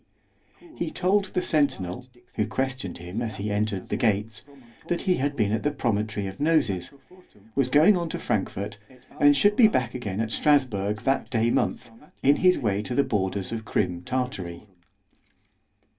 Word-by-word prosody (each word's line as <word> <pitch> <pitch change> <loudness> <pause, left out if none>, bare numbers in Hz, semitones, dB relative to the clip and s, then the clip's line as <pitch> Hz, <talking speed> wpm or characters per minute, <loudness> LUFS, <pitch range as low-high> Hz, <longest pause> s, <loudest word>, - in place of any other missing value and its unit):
_ 335 -2 -17
He 170 - -1
told 190 +4 +1
the 180 -1 -2
centinel, 130 - 0 0.3
who 105 - -1
questioned 130 -8 -3
him 90 +6 -5
as 110 -4 -3
he 105 +1 -3
entered 105 -2 -2
the - - -1
gates, 110 0 0 0.4
that 175 - -1
he 185 -3 +2
had 140 +2 -1
been 105 -5 +1
at 110 - 0
the 150 - +1
Promontory 110 -7 -1
of 95 0 -7
NOSES—was 135 - -2
going 155 +9 +6
on 170 -2 -2
to - - -3
Frankfort——and 110 +8 -1
should 205 +9 +4
be 225 -1 +7
back 130 - 0
again 105 -6 -4
at 110 0 -1
Strasburg 110 -9 +1
that 135 +3 0
day 115 0 +1
month, 120 0 -1 0.3
in 140 +2 +5
his 180 0 +4
way 105 -5 0
to 120 +3 -4
the 140 - +4
borders 95 -3 -2
of 115 -1 -4
_Crim 90 -4 -1
Tartary. 125 -10 -3
120 Hz, 165 wpm, -25 LUFS, 100-145 Hz, 0.4 s, be